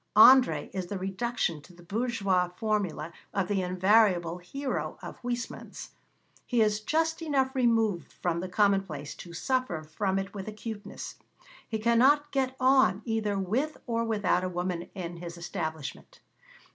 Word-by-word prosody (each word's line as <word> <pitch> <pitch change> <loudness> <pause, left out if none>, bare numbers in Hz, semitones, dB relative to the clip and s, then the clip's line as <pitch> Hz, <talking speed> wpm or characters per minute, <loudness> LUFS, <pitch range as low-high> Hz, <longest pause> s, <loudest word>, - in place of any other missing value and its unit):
André 255 +4 +7
is 185 -2 -3
the 200 - -4
reduction 190 -3 -2
to 175 - -17
the 175 0 -16
bourgeois 200 -3 0
formula 190 -7 -1 0.2
of 195 -3 +1
the 195 -1 +1
invariable 185 -2 +3
hero 265 +10 -4
of - - -8
Huysmans. 245 -1 -5 0.6
He 245 - +1
is 210 -1 +3
just 320 +8 0
enough 270 -4 +1
removed 225 -8 +1
from 170 -1 -1
the 185 +1 -4
commonplace 195 -7 +1
to 170 - -10
suffer 200 -4 -1
from 190 +5 -1
it 195 +1 -3
with 195 -1 -6
acuteness. 215 0 -7 0.5
He 220 - -1
cannot 260 +7 +4
get 265 -1 0
on 255 -7 +4
either 220 -3 0
with 235 +11 -1
or 230 -1 0
without 205 -5 +1
a 185 - -1
woman 180 -1 -3
in 175 -3 -5
his 170 0 -7
establishment. 160 -4 -5
205 Hz, 145 wpm, -29 LUFS, 180-235 Hz, 0.6 s, André